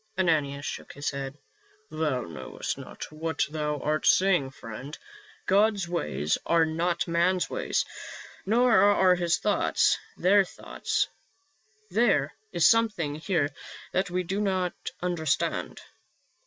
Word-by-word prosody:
Ananias 150 -6 +1
shook - - -6
his 145 +1 -3
head. 140 0 -5 0.3
" 415 +1 -34
Thou 155 -5 -1
knowest 75 - -5
not - - -9
what 160 +1 -1
thou 150 -1 -2
art 155 +3 0
saying, 180 -8 +4
friend. 130 +3 -9 0.5
God's 200 -2 +3
ways 75 - -1
are 165 -1 +3
not 170 +2 -1
man's 175 +2 +1
ways, - - 0 0.6
nor 235 +3 +3
are 195 -2 +5
his 175 -1 +1
thoughts 210 - +2 0.2
their 195 +2 +5
thoughts. 185 - -2 0.8
There 185 -9 +2 0.2
is 170 -2 +4
something 215 -10 +2
here 160 -1 0 0.4
that 190 +1 0
we 180 +1 -1
do 195 +4 -2
not 185 -3 0 0.3
understand." 165 -5 -1
170 Hz, 125 wpm, -27 LUFS, 150-195 Hz, 0.8 s, are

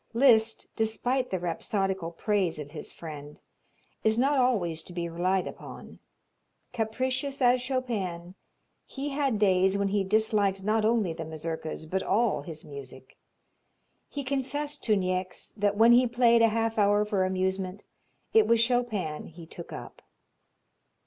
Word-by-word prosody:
Liszt, 230 -3 +4
despite 245 +4 0
the 190 - -1
rhapsodical 190 0 -2
praise 185 0 0
of 145 -1 -7
his 150 - -7
friend, 150 -3 -9 0.6
is 220 0 +3
not 275 +3 +3
always 185 -11 +1
to 175 - -9
be 170 -1 -3
relied 180 +3 0
upon. - - -10 0.7
Capricious 255 +4 -2
as 250 -1 +4
Chopin, 205 -10 -3 0.5
he 280 +1 -4
had 275 -5 0
days 190 -1 +3
when 200 0 0
he 200 0 +1
disliked 205 -1 +1
not 215 +2 +1
only 215 -6 +2
the 165 0 -6
Mazurkas, 160 0 -5
but 190 +4 -2
all 230 +1 +1 0.2
music. 130 -2 -10 0.9
He 285 - -5
confessed 285 +2 -3
to 215 - +4
Niecks 185 -1 -2
that 205 -1 0
when 230 +2 +7
he 245 +1 +6
played 235 -1 +4
a 230 - +6
half 225 0 0
hour 205 +1 +4
for 205 -3 0
amusement 190 +1 -2 0.5
it 445 -1 +5
was 230 0 +4
Chopin 230 -10 0
he 165 0 -12
took 170 +1 -10
up. - - -9
205 Hz, 140 wpm, -28 LUFS, 180-240 Hz, 0.9 s, when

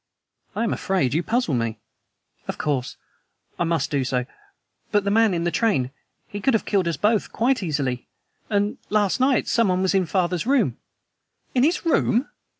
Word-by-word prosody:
"I 220 - 0
am 230 - 0
afraid 165 -10 0
you 160 - +2
puzzle 225 - 0
me." 115 -2 -1 0.7
"Of - - -4
course, 140 -5 -2 0.6
I 175 - +2
must 165 -5 0
do 140 -2 +1
so. 125 -1 -1 0.7
But 205 -1 +2
the 200 - 0
man 225 0 +4
in 170 -2 -1
the 175 - 0
train. 170 - +1 0.4
He 205 - -6
could 265 +3 +3
have 225 - 0
killed 195 -4 +1
us 170 - -1
both 210 0 +1
quite 250 +1 +1
easily! 140 -8 -2 0.4
And 205 0 0
last 205 0 +1
night 260 0 +2
someone 190 -5 +2
was 190 - +2
in 190 -3 +2
father's 180 +2 0
room." 275 0 +2 0.8
"In 250 - +2
his 325 +6 +2
room!" 275 -5 +2
195 Hz, 175 wpm, -23 LUFS, 155-225 Hz, 0.8 s, man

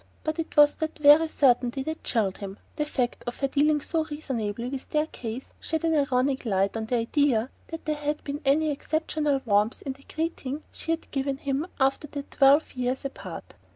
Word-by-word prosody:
But 310 +1 -2
it 320 - -4
was 295 0 +8
that 315 0 -3
very 300 +2 +7
certainty 260 -3 +2
which 315 +3 -4
chilled 205 -6 0
him. 195 0 -6 0.2
The 300 -1 -1
fact 250 -5 -1
of 240 - -3
her 275 - 0
dealing 295 +2 +2
so 320 +2 0
reasonably 245 -7 -3
with 265 0 -5
their 305 0 +2
case 245 -4 -7
shed 320 -1 -2
an 325 -1 +2
ironic 275 -2 +1
light 195 -3 +1
on 220 0 -3
the 245 - 0
idea 245 0 +2 0.2
that 325 0 -7
there 305 -1 -1
had 295 0 -2
been 285 +1 -4
any 300 +3 +3
exceptional 300 -1 -1
warmth 210 +1 +2
in 270 - -3
the 275 +1 -19
greeting 315 -3 -3
she - - -10
had 330 0 -1
given 270 -1 -1
him 280 +3 -2
after 270 +2 +2
their 285 0 -5
twelve 280 +3 +5
years 255 +1 -2
apart. 275 - -7
280 Hz, 195 wpm, -27 LUFS, 250-305 Hz, 0.2 s, was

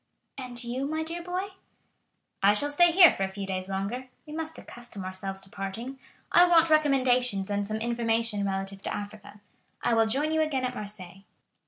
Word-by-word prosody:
"And 250 -2 -5
you, 250 +3 -3
my 315 +1 -2
dear 335 +2 -5
boy?" 365 +3 -3 0.9
"I 200 +1 +5
shall 290 +7 +2
stay 345 +4 +6
here 350 -1 +8
for - - -6
a 195 - +2
few 195 +1 -6
days 185 0 -3
longer; 205 +7 -3 0.2
we 300 - -10
must 320 0 -4
accustom 240 -5 -9
ourselves 190 +1 -4
to 195 - -6
parting. 225 +7 -6 0.3
I 355 +1 +7
want 330 -2 +5
recommendations 255 -9 +2
and 205 0 -1
some 215 +1 -2
information 230 -2 0
relative 195 0 -3
to - - -4
Africa. 205 0 -9 0.4
I 240 - +2
will 225 -1 +4
join 285 +7 0
you 315 0 +2
again 275 -5 0
at 250 - -2
Marseilles." 195 -4 -5
235 Hz, 185 wpm, -28 LUFS, 200-290 Hz, 0.9 s, here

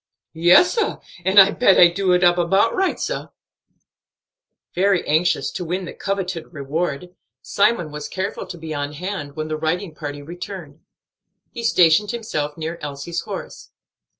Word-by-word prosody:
"Yes, 175 - +5
sah, 455 - -1 0.3
and 190 +3 +5
I 195 +1 +8
bet 215 -5 +4
I 175 - +9
do 185 +2 0
it 180 0 +2
up 175 0 +4
about 195 +6 +2
right, 380 0 0
sah." - - -3 1.5
Very 190 0 +1
anxious 160 +2 +1
to - - -5
win 180 +2 -3
the - - -8
coveted 190 -4 -4
reward, 155 +3 -4 0.3
Simon 200 -6 +1
was 150 0 -6
careful 190 +2 -4
to 175 - -8
be 160 -1 -6
on 145 0 -3
hand 155 -3 -5
when 155 0 -4
the 155 0 -3
riding 165 +3 -2
party 145 -2 -7
returned. 175 -2 -8 0.7
He 235 - -7
stationed 180 -2 +4
himself 160 -11 -3
near 165 +1 -5
Elsie's 150 +3 -5
horse. - - -8
175 Hz, 155 wpm, -21 LUFS, 155-195 Hz, 1.5 s, I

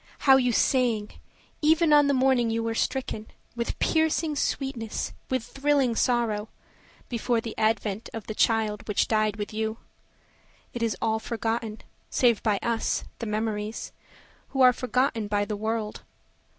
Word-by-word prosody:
How 270 -1 +8
you 250 -2 +2
sang, 235 -3 +2 0.5
even 320 +1 +4
on 290 -1 +6
the 280 - +2
morning 255 -2 +3
you 225 0 -1
were 225 0 -1
stricken, 225 -2 -2 0.3
With 235 0 -3
piercing 320 -1 +1
sweetness, 265 -5 -2 0.2
with 260 -3 0
thrilling 270 -1 +1
sorrow, 225 -3 +1 0.6
Before 235 0 0
the 225 -1 -6
advent 215 -1 0
of 225 -2 -7
the 215 - -5
child 215 -1 +1
which 210 - +1
died 215 -2 +1
with 205 0 -5
you. 220 0 -2 1.0
It 240 - -5
is 230 -3 0
all 220 -1 +1
forgotten, 225 -1 -3 0.3
save 235 -4 +3
by 210 -3 +1
us, 230 -1 0 0.2
the 230 - -4
memories, 215 0 -3 0.6
Who 270 - -2
are 250 -1 +8
forgotten 250 -3 0
by 205 0 0
the 210 - -3
world. 220 0 -3
230 Hz, 150 wpm, -26 LUFS, 215-255 Hz, 1.0 s, How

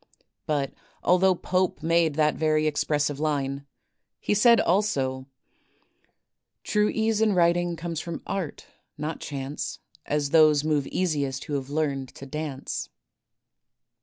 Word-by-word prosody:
'' - - -55
But 145 -3 -1 0.3
although 185 +1 +4
Pope 185 -1 -1
made 165 -2 +2
that 150 -1 +3
very 155 -1 +1
expressive 145 -1 0
line, 140 -2 -1 0.5
he - - 0
said 230 +3 +6
also: 135 -9 0 1.4
*'True 210 0 +2
ease 220 -1 0
in 215 -2 +3
writing, 175 0 +2
comes 165 -1 -4
from 170 0 -6
art, 190 -6 -4 0.3
not 155 +2 -4
chance, 140 0 -5 0.3
As 145 -1 0
those 155 -3 +5
move 150 -3 0
easiest 145 -7 -1
who 150 - -6
have 140 -1 -2
learned 140 -3 -1
to 140 - -9
dance." 145 -1 -5
155 Hz, 130 wpm, -26 LUFS, 140-175 Hz, 1.4 s, said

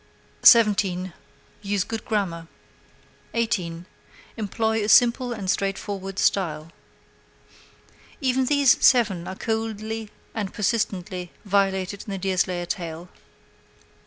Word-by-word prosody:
17. 195 -6 +5 0.5
Use 200 -2 0
good 225 -1 -5
grammar. 180 -7 -2 0.9
18. 180 -7 -1 0.5
Employ 220 0 -1
a 210 - -2
simple 245 +2 +5
and 210 -5 -5
straightforward 195 0 -2
style. 165 -6 0 1.5
Even 260 -1 +1
these 285 -1 +3
seven 205 -9 +4
are 190 - -5
coldly 220 0 -3 0.2
and 205 -4 -4
persistently 190 -4 -2
violated 195 0 0
in - - -7
the 195 - -3
Deerslayer 185 -2 -1
tale. 170 0 -5
200 Hz, 100 wpm, -24 LUFS, 185-225 Hz, 1.5 s, 17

